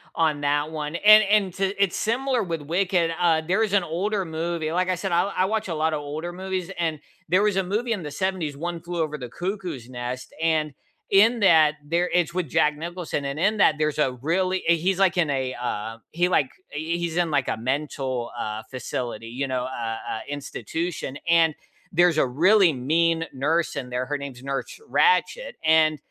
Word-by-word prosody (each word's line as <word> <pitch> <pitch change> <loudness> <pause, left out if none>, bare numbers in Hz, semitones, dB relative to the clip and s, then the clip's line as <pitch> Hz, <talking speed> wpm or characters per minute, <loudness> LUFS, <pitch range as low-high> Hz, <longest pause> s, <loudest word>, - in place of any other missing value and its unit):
on 155 -3 +1
that 145 +2 0
one. 150 +1 -4
And 215 +3 +8
and 200 -3 +2
to 195 +1 +1
it's 185 - 0
similar 250 +2 0
with 165 -5 -3
Wicked. 175 +1 +1
Uh 165 -2 +3
there 185 +7 0
is 210 -3 0
an 195 -3 +4
older 190 +5 -1
movie 160 -1 -3
like 180 +2 0
I 185 - +2
said 190 +2 -4
I 170 +1 +3
I 195 -2 -1
watch 215 +1 -1
a 165 - -3
lot 155 +1 +1
of 150 - -1
older 155 +4 -5
movies 185 0 -4
and 160 -3 -1 0.3
there 185 +5 +3
was 205 -2 +1
a 195 - +2
movie 225 +5 -1
in 205 -5 -1
the 150 - -6
70s, 175 -2 -2
One 170 +3 -4
Flew 170 0 -4
Over 150 -1 -2
the 125 - -7
Cuckoo's 175 - -5
Nest, 125 0 -6
and 160 -2 +1 0.4
in 225 +4 +5
that, 155 -6 +5
there 170 +3 0
it's 175 -1 +2
with 180 -4 -1
Jack 150 +3 +2
Nicholson 170 -3 -4
and 140 +1 -3
in 210 +7 +2
that, 195 - +5
there's 155 -1 0
a 135 -4 +2
really 185 +5 0
eh, 170 - +6
he's 185 +3 0
like 185 -2 +3
in 160 -4 +2
a, 130 -2 -1
uh, 110 -1 -3
he 175 +2 +1
like, 145 - +3 0.3
eh, 150 - -5
he's 170 +1 -2
in 175 -2 +1
like 140 -3 +1
a - - 0
mental, 130 0 -2
uh, 110 -1 -3
facility, 120 -3 -4
you 135 +4 -3
know, 130 -1 -1
uh 115 -3 -4 0.2
uh, - - -3
institution 145 +1 -4
and 165 -2 +4 0.4
there's 175 -1 +4
a 135 - +3
really 180 +6 +4
mean 165 +5 +1
nurse 155 +3 0
in 125 -2 -4
there, 125 +1 -2
her 145 +1 -1
name's 135 -3 -8
Nurse 135 0 -4
Ratchet, - - +2
and, 155 -1 +4
165 Hz, 205 wpm, -24 LUFS, 145-185 Hz, 0.4 s, And